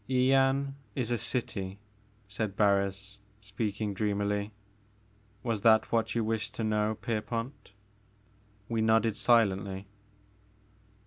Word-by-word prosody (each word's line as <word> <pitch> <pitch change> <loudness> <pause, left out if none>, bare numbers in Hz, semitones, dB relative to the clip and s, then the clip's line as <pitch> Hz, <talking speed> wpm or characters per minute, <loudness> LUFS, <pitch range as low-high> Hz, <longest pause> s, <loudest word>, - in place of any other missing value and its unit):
Yian 135 +1 +3 0.2
is 120 -2 -2
a 120 - +2
city," 100 -5 -3 0.5
said 100 0 -3
Barris, 100 0 +1 0.2
speaking 105 0 -3
dream 100 +1 -1
ily; 105 +1 -1 0.9
"was 115 -4 -1
that 110 0 +5
what 115 -1 +1
you 115 - +1
wished 110 0 -2
to 115 - -3
know, 110 0 +1
Pier 110 0 -2
pont?" 120 +3 -5 1.0
We 115 -1 -1
nodded 110 -1 +3
silently. 100 -4 +2
110 Hz, 115 wpm, -30 LUFS, 100-115 Hz, 1.0 s, that